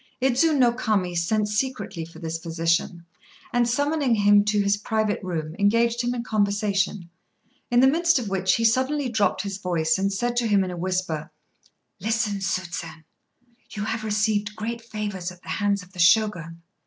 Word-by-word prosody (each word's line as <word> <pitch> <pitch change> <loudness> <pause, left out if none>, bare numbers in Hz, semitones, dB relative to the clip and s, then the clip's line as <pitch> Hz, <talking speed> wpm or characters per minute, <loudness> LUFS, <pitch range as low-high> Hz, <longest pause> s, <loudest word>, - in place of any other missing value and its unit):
Idzu 270 +5 +2
no 245 -3 +5
Kami 210 -7 -1
sent 205 +5 0
secretly 210 -6 -3
for 165 - -14
this 165 0 -4
physician, 165 +1 -1 0.5
and, 240 0 +2
summoning 285 0 +1
him 205 -1 +5
to 210 0 +1
his 200 0 +2
private 215 0 -1
room, 165 -4 -4
engaged 230 +3 +2
him 245 +1 -1
in 235 - -3
conversation, 200 -3 0 0.6
in 240 0 +4
the 265 - +6
midst 335 +4 +3
of 240 -4 -3
which 190 -1 +1
he 230 - 0
suddenly 260 +4 +1
dropped 220 -4 +1
his 200 -1 -5
voice 165 -3 0
and 195 +1 0
said 240 +5 -1
to 240 -1 +2
him 200 -2 +3
in 185 - -4
a - - -5
whisper 175 -3 -2 0.7
"Listen, 215 0 -1
Tsusen. 175 -4 -4 0.7
You 210 - -5
have 220 0 -3
received 210 0 0
great 230 +2 -4
favours 205 -5 -5
at 180 0 -16
the - - -11
hands 200 -1 0
of 180 +1 -19
the 180 - -11
Shogun. 170 -3 +2
205 Hz, 175 wpm, -24 LUFS, 180-230 Hz, 0.7 s, the